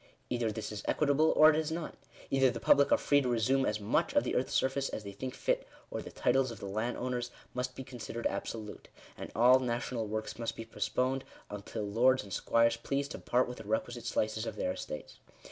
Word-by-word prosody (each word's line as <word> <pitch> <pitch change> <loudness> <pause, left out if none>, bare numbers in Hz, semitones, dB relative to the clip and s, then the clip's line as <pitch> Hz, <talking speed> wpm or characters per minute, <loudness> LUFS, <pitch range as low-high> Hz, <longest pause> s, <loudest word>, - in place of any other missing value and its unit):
Either 120 -3 0
this 110 0 -5
is 105 - -5
equitable, 150 +1 +3
or 155 +1 +8
it - - 0
is 160 0 -1
not. 165 -1 -4 0.4
Either 135 -1 +4
the 115 - -4
public 140 +4 +5
are - - +6
free 145 0 +3
to 125 - -1
resume 130 +3 +2
as 105 0 0
much 150 - +1
of 290 - +5
the - - -2
earth's 125 - 0
surface 135 +1 +1
as 110 - -5
they 100 - -6
think 130 +5 -6
fit, - - 0 0.2
or - - -3
the - - -8
titles 135 -1 +2
of 115 - -8
the - - -7
landowners 120 +4 -2 0.2
must 125 0 -3
be 130 - -6
considered 120 -2 -7
absolute, 110 -2 -4 0.3
and - - -8
all 125 +3 +7
national 120 -2 -2
works 110 +2 -4
must 115 - -2
be 115 - -7
postponed 125 +5 -1 0.3
until 105 +2 -5
lords 120 +5 +3
and 100 -2 -9
squires 115 0 +3
please 140 +4 -2
to 155 - -7
part 125 +1 +2
with 125 - -7
the - - -7
re 110 +2 +2
quisite 120 0 -8
slices 110 -1 -1
of - - -4
their - - -1
estates. 75 - -7
120 Hz, 220 wpm, -32 LUFS, 110-135 Hz, 0.4 s, or